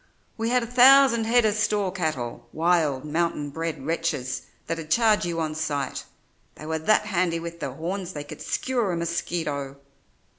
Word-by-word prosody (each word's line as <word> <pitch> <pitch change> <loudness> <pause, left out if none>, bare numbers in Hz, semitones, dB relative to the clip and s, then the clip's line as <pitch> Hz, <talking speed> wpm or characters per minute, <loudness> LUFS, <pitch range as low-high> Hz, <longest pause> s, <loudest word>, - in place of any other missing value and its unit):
"We 225 0 -2
had 250 0 +2
a - - -2
thousand 250 -1 +6
head 240 +1 +4
of 215 - +3
store 210 -2 0
cattle, 155 -10 -3
wild, 160 -5 +1
mountain 150 -2 -1
bred 160 -3 -4
wretches 160 -6 -2 0.2
that'd 165 -1 -4
charge 215 +1 +3
you 170 -1 -2
on 155 -1 -1
sight; 145 -3 -3 0.5
they 155 - -10
were 160 0 -2
that 210 +6 +3
handy 175 -4 0
with 170 0 -7
their 135 -5 -4
horns 180 +5 -4
they 145 - -5
could 145 - -10
skewer 240 -7 -1
a - - -1
mosquito. 165 -4 -3
170 Hz, 170 wpm, -25 LUFS, 155-210 Hz, 0.5 s, thousand